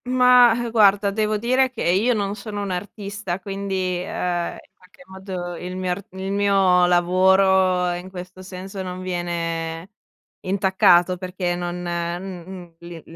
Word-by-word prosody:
Mah, 250 Hz, -1 st, +6 dB
ehm, 240 Hz, -1 st, -3 dB
guarda 205 Hz, -2 st, +4 dB
devo 215 Hz, +1 st, 0 dB
dire 255 Hz, +4 st, +2 dB
che 255 Hz, -, -6 dB
io 205 Hz, +8 st, +2 dB
non 200 Hz, -2 st, -1 dB
sono 205 Hz, 0 st, -6 dB
un'artista, 200 Hz, 0 st, -5 dB
quindi, 195 Hz, 0 st, -4 dB, 0.3 s
ehm, 175 Hz, -2 st, -2 dB
in -, -, -18 dB
qualche 180 Hz, 0 st, -20 dB
modo 190 Hz, -2 st, -7 dB
il 180 Hz, +2 st, -7 dB
mio 185 Hz, -1 st, -2 dB
ar 190 Hz, +3 st, -4 dB
il 190 Hz, +1 st, -5 dB
mio 195 Hz, -3 st, +3 dB
lavoro, 185 Hz, 0 st, +3 dB
in 175 Hz, +2 st, -7 dB
questo 185 Hz, 0 st, -9 dB
senso, 190 Hz, +1 st, -8 dB
non 185 Hz, 0 st, -6 dB
viene 170 Hz, -1 st, -3 dB, 0.5 s
intaccato 190 Hz, -2 st, +3 dB
perché 180 Hz, -1 st, -3 dB
non 175 Hz, 0 st, -4 dB
m -, -, -6 dB, 0.3 s
m 180 Hz, -2 st, -9 dB
l 170 Hz, -1 st, -10 dB
185 Hz, 145 wpm, -22 LUFS, 180-200 Hz, 0.5 s, Mah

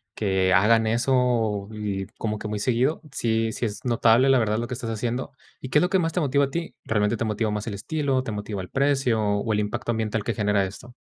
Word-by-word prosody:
que 95 Hz, -3 st, +1 dB
hagan 110 Hz, +3 st, +4 dB
eso 115 Hz, -3 st, +1 dB
y 100 Hz, -3 st, -3 dB
como 105 Hz, -1 st, -3 dB
que 105 Hz, -, -5 dB
muy 105 Hz, -1 st, -3 dB
seguido, 125 Hz, +7 st, +1 dB
sí 115 Hz, -2 st, 0 dB
sí 120 Hz, -, -2 dB
es 105 Hz, +3 st, -5 dB
notable, 120 Hz, +2 st, +4 dB
la 135 Hz, -, +5 dB
verdad, 110 Hz, -2 st, +1 dB
lo 120 Hz, -, -3 dB
que 125 Hz, -, -5 dB
estás 120 Hz, -2 st, -4 dB
haciendo, 120 Hz, +3 st, -3 dB, 0.3 s
¿y 130 Hz, -, -6 dB
qué 150 Hz, -, +4 dB
es -, -, +1 dB
lo 180 Hz, -, +2 dB
que 190 Hz, -, +3 dB
más 165 Hz, -2 st, 0 dB
te 180 Hz, -, -1 dB
motiva 140 Hz, -2 st, +2 dB
a -, -, -6 dB
ti? 170 Hz, 0 st, -4 dB
¿Realmente 105 Hz, +1 st, +1 dB
te 115 Hz, -, -2 dB
motiva 110 Hz, 0 st, -1 dB
más 105 Hz, +1 st, -3 dB
el 105 Hz, -, -3 dB
estilo, 135 Hz, +3 st, -1 dB
te 115 Hz, -, -5 dB
motiva 105 Hz, -1 st, -4 dB
el 90 Hz, -, -9 dB
precio, 135 Hz, -5 st, +1 dB
o 105 Hz, +2 st, 0 dB
el 105 Hz, -, +1 dB
impacto 105 Hz, +3 st, -2 dB
ambiental 110 Hz, -1 st, -1 dB
que 115 Hz, -, 0 dB
genera 105 Hz, -1 st, +1 dB
esto? 120 Hz, +6 st, -10 dB
115 Hz, 245 wpm, -25 LUFS, 105-125 Hz, 0.3 s, la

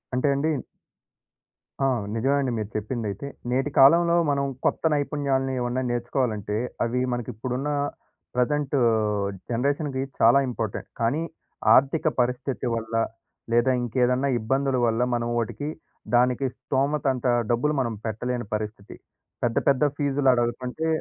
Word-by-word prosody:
అంటే, 130 Hz, +3 st, +1 dB
అండి 150 Hz, +3 st, 0 dB, 1.4 s
ఆ! -, -, +4 dB, 0.3 s
నిజమే 135 Hz, +5 st, +1 dB
అండి 130 Hz, -2 st, -1 dB
మీరు 105 Hz, -1 st, -3 dB
చెప్పిందైతే. 110 Hz, +2 st, -3 dB, 0.2 s
నేటి 135 Hz, +3 st, 0 dB
కాలంలో 170 Hz, +5 st, +6 dB
మనం 140 Hz, -1 st, +1 dB, 0.2 s
కొత్త -, -, +1 dB
నైపుణ్యాల్ని 140 Hz, -2 st, 0 dB
ఏమన్నా 120 Hz, +1 st, -1 dB
నేర్చుకోవాలంటే, 120 Hz, -4 st, -1 dB, 0.3 s
అవి 120 Hz, +2 st, 0 dB
మనకిప్పుడున్న 125 Hz, +3 st, -3 dB, 0.7 s
ప్రజెంటు 140 Hz, +3 st, +1 dB, 0.7 s
జనరేషన్‌కి 140 Hz, +3 st, 0 dB, 0.2 s
చాలా 120 Hz, +4 st, +6 dB
ఇంపార్టెంట్. 115 Hz, -4 st, -4 dB
కానీ 120 Hz, +8 st, +1 dB, 0.5 s
ఆర్థిక 140 Hz, +4 st, +3 dB
పరిస్థితి 125 Hz, +2 st, -2 dB
వల్ల, 115 Hz, 0 st, -5 dB, 0.6 s
లేదా 120 Hz, +2 st, +4 dB
ఇంకేదన్నా 125 Hz, +3 st, +1 dB
ఇబ్బందుల 135 Hz, +4 st, 0 dB
వల్ల, 115 Hz, 0 st, +1 dB
మనం 120 Hz, 0 st, -1 dB
వోటికి 130 Hz, +6 st, -2 dB, 0.5 s
దానికి 125 Hz, +2 st, +3 dB
స్థోమతంత 135 Hz, -2 st, 0 dB, 0.3 s
డబ్బులు 135 Hz, +6 st, +1 dB
మనం 115 Hz, -2 st, -1 dB
పెట్టలేని 120 Hz, +2 st, -3 dB
పరిస్థితి. 105 Hz, -1 st, -6 dB, 0.5 s
పెద్ద 120 Hz, -1 st, +1 dB
పెద్ద 135 Hz, +1 st, +3 dB
ఫీజులడుగుతుంటే 130 Hz, 0 st, +1 dB
125 Hz, 110 wpm, -25 LUFS, 120-140 Hz, 1.4 s, కాలంలో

